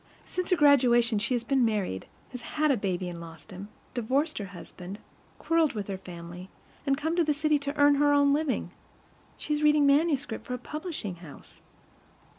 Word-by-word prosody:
Since 365 -1 -4
her 365 - +4
graduation 245 -6 +4
she 235 +5 0
has 235 - -2
been 265 +1 +2
married, 205 - -1 0.2
has 250 -2 -7
had 305 +4 0
a - - +3
baby 185 -4 -2
and 170 -1 -7
lost 165 +4 -12
him, 190 +2 -8 0.3
divorced 270 +6 0
her 205 - -4
husband, 185 0 -9 0.4
quarreled 330 -2 +2
with 210 -3 -4
her 195 - -3
family, 175 +1 -9 0.4
and 275 0 +2
come 320 +3 -1
to 345 - +3
the 300 -2 +1
city 305 0 +2
to 285 +1 -4
earn 290 0 +6
her 290 0 +4
own 285 -1 +4
living. 300 -2 -1 0.7
She 300 - -3
is 300 - -1
reading 300 -1 +4
manuscript 285 -4 +2
for 250 - -2
a - - -4
publishing 295 - -6
house. 165 -4 -13
260 Hz, 190 wpm, -28 LUFS, 200-295 Hz, 0.7 s, earn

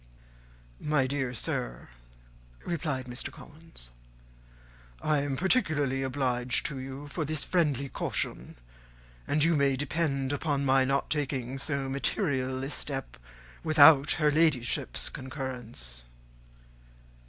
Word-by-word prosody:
"My 150 -3 +1
dear 130 -1 -1
sir," - - -3 0.8
replied 150 -6 -2
Mr. 125 +1 -5
Collins, 155 - -11 1.1
"I 150 -1 +1
am 140 -1 -2
particularly 155 - +1
obliged 130 -2 0
to 140 -3 -3
you 135 +2 -7
for 150 +3 -3
this 155 0 0
friendly 145 -6 +1
caution, - - -3 0.7
and 150 0 +2
you 165 +1 +4
may 140 -2 +3
depend 140 -1 -1
upon 145 -1 0
my 135 0 +4
not 135 +1 0
taking 135 -3 -1
so 140 -1 -1
material 135 -2 0
a 135 - -3
step 135 -2 -3 0.5
without 150 -2 +7
her 150 -1 +2
Ladyship's 145 -6 +2
concurrence." 125 - -5
140 Hz, 110 wpm, -29 LUFS, 130-150 Hz, 1.1 s, without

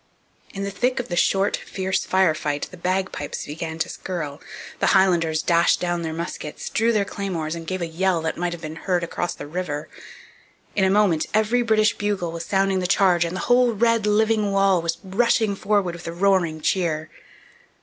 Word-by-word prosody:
In 195 - -5
the 200 - -3
thick 250 +5 0
of 245 - -4
the 175 - -2
short, 195 +3 +2
fierce 190 0 -2
fire 185 -3 +3
fight 145 -1 -3
the - - -9
bagpipes 185 -3 -3
began 160 +2 -5
to 160 - -1
skirl, 155 -6 -5 0.4
the - - +2
Highlanders 170 -4 +2
dashed 170 -1 +3
down 175 -1 -1
their 160 -1 -3
muskets, 160 -2 -5
drew 230 +2 +2
their 210 -3 +1
claymores, 175 -6 -3
and 165 -1 -7
gave 185 0 -2
a - - 0
yell 175 +2 0
that 160 - -1
might 175 0 -2
have 175 -1 -7
been 155 +1 -6
heard 180 0 -1
across 175 +1 -3
the - - -8
river. 150 -2 -4 0.9
In 195 - +2
a - - +3
moment 195 -5 +3
every 220 +3 +2
British 215 -2 +3
bugle 200 -5 -2
was 170 0 -6
sounding 195 -1 +1
the 180 - -1
'Charge' 180 -3 +3
and 170 +2 -4
the - - -3
whole 245 -1 +3
red, 230 0 +2
living 215 0 +2
wall 195 -2 +3
was 165 0 -2
rushing 210 +1 +1
forward 195 -3 0
with 170 0 -9
a - - -3
roaring 175 -4 +1
cheer. 160 -3 -1
185 Hz, 195 wpm, -23 LUFS, 165-200 Hz, 0.9 s, fire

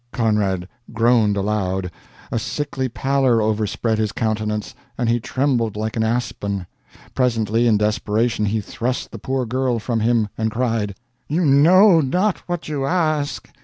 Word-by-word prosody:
Conrad 105 -6 0 0.2
groaned 115 -3 +3
aloud. 95 -3 -1 0.4
A 115 - 0
sickly 135 +2 -3
pallor 135 -1 +1
overspread 110 +1 0
his 110 -2 0
countenance, 105 -1 -2 0.2
and 120 - 0
he 120 +1 +2
trembled 120 -4 0
like 110 +1 -3
an 115 - 0
aspen. 105 -4 -2 0.5
Presently, 115 -2 +1
in 110 -2 +4
desperation, 105 +1 0
he 105 +1 0
thrust 120 +5 -3
the - - -8
poor 130 -1 -2
girl 125 +1 0
from 115 +1 -2
him, 110 -1 +2
and 110 0 +1
cried: 115 -3 -1 0.3
"You 165 +4 0
know 165 +6 +6
not 180 +8 0
what 175 -1 -3
you 145 -3 -2
ask! 155 -4 0
115 Hz, 145 wpm, -21 LUFS, 105-130 Hz, 0.5 s, know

